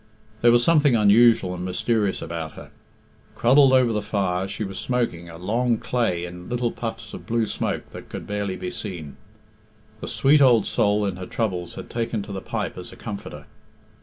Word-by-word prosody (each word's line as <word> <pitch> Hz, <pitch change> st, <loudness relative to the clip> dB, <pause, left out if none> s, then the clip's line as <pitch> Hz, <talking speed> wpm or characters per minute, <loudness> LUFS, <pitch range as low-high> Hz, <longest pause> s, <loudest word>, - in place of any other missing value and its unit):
There 120 Hz, -, +6 dB
was 120 Hz, 0 st, +4 dB
something 150 Hz, -5 st, +4 dB
unusual 105 Hz, -2 st, +5 dB
and 90 Hz, 0 st, -5 dB
mysterious 100 Hz, +2 st, 0 dB
about 80 Hz, -1 st, -5 dB
her. -, -, -12 dB, 0.6 s
Cruddled 135 Hz, +3 st, +5 dB
over 130 Hz, -3 st, +4 dB
the 105 Hz, -, 0 dB
fire, 95 Hz, -3 st, -1 dB
she 100 Hz, +2 st, -4 dB
was 95 Hz, -2 st, -5 dB
smoking, 115 Hz, -9 st, -2 dB
a 85 Hz, -, -10 dB
long 115 Hz, +6 st, 0 dB
clay 110 Hz, -10 st, -1 dB
in 90 Hz, +2 st, -9 dB
little 120 Hz, -1 st, -1 dB
puffs 115 Hz, -2 st, -6 dB
of -, -, -9 dB
blue 115 Hz, -1 st, +1 dB
smoke -, -, -3 dB
that -, -, -10 dB
could -, -, -7 dB
barely 100 Hz, -2 st, -3 dB
be 90 Hz, -1 st, -5 dB
seen. 85 Hz, -9 st, -6 dB, 0.8 s
The -, -, -6 dB
sweet 145 Hz, +2 st, +4 dB
old 120 Hz, -6 st, +5 dB
soul 105 Hz, 0 st, +1 dB
in 95 Hz, -2 st, -3 dB
her 90 Hz, 0 st, -7 dB
troubles 90 Hz, -7 st, -3 dB
had -, -, -8 dB
taken 115 Hz, -3 st, -2 dB
to 100 Hz, -, -9 dB
the 95 Hz, -1 st, -5 dB
pipe -, -, -4 dB
as -, -, -9 dB
a -, -, -11 dB
comforter. 100 Hz, -, -8 dB
105 Hz, 190 wpm, -23 LUFS, 90-120 Hz, 0.8 s, There